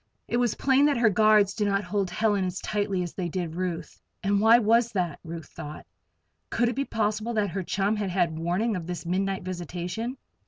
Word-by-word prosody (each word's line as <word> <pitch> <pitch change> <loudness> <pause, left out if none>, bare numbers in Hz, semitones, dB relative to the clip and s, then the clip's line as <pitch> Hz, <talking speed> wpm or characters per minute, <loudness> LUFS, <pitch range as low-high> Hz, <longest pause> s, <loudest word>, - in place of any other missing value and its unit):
It 240 - 0
was 240 -3 +1
plain 275 +1 +4
that 290 - +2
her 235 -2 +4
guards 215 -1 +4
did 210 -2 0
not 200 0 +1
hold 195 0 -1
Helen 205 +1 +1
as 185 +1 -3
tightly 200 -3 -1
as 175 - -6
they 180 -3 -3
did 170 -2 -3
Ruth. 175 -1 -4 0.2
And 200 0 +2
why 225 +2 +7
was 230 +1 +3
that? 175 -6 -1
Ruth 165 -1 -7
thought. 150 +1 -9 0.6
Could 240 0 +1
it 240 - -3
be 275 +1 -1
possible 215 +1 -1
that 205 -4 +1
her 195 - -2
chum 195 +3 0
had 205 -2 -2
had 175 -3 0
warning 185 +7 0
of 170 -2 -5
this 175 -1 -5
midnight 190 +2 -1
visitation? 180 - -4
195 Hz, 205 wpm, -27 LUFS, 180-220 Hz, 0.6 s, why